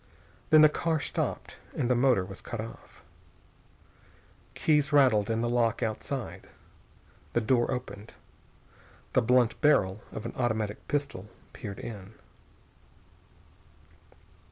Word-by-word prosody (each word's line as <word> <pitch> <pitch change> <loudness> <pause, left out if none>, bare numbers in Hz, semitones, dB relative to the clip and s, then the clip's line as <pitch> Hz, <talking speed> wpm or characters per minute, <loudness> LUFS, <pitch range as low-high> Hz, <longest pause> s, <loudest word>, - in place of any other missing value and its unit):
Then 155 -1 +7
the - - +10
car 160 +1 -1
stopped - - -3 0.2
and 120 - 0
the 125 - +3
motor 125 -6 +3
was 95 0 -9
cut 120 - -6
off. 115 +1 -10 1.5
Keys 150 -2 +2
rattled 125 -7 +4
in 115 0 0
the 120 - 0
lock 120 -1 +1
outside. 115 +4 -4 0.8
The - - +3
door 120 +1 +2
opened. 125 -4 -6 1.0
The 130 - +4
blunt 120 0 +2
barrel 105 -9 +3
of 110 - -7
an 115 - -5
automatic 110 -4 -2
pistol 140 -8 -3 0.3
peered 100 -3 -7
in. 100 -1 -8
120 Hz, 115 wpm, -28 LUFS, 110-135 Hz, 1.5 s, the